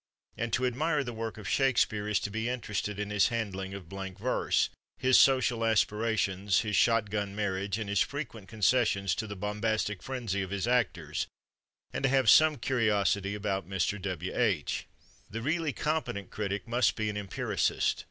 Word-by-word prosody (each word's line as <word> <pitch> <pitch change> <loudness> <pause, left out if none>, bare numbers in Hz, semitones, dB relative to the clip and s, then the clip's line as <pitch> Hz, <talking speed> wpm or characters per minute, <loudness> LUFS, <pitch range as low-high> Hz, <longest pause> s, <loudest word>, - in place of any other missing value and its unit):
And 115 0 -3
to 130 - +2
admire 150 +4 +1
the 120 -2 -5
work 115 0 -5
of 105 -3 -8
Shakespeare 115 -6 +2
is 105 -3 +2
to 100 - -3
be 110 +3 -2
interested 105 -4 -3
in 105 0 -3
his 100 -2 +4
handling 100 -5 -3
of 95 -4 -9
blank 95 +1 -7
verse, - - +1 0.3
his 130 0 +3
social 125 -3 +4
aspirations, 105 -3 +1
his 105 -2 -2
shot 115 -3 +3
gun 100 -1 -2
marriage 100 -1 -1
and 110 -2 -4
his 100 -1 +1
frequent 115 - -3
concessions 100 -2 +2
to 110 - -3
the 100 - -6
bombastic 105 0 -1
frenzy 120 -7 -3
of 95 - -4
his 100 +3 -2
actors, 120 -4 0 0.7
and - - -2
to 135 - +2
have 130 -4 +5
some 155 -1 +6
curiosity 105 -5 +1
about 100 -3 -2
Mr. 95 +1 -1
W. 95 -1 -4
H. 100 -12 0 0.4
The 115 +2 -5
really 160 +2 0
competent 150 - -2
critic 105 +1 -3
must 120 +1 +2
be 110 - -1
an 105 - -2
empiricist. 100 -3 0
105 Hz, 170 wpm, -30 LUFS, 100-120 Hz, 0.7 s, some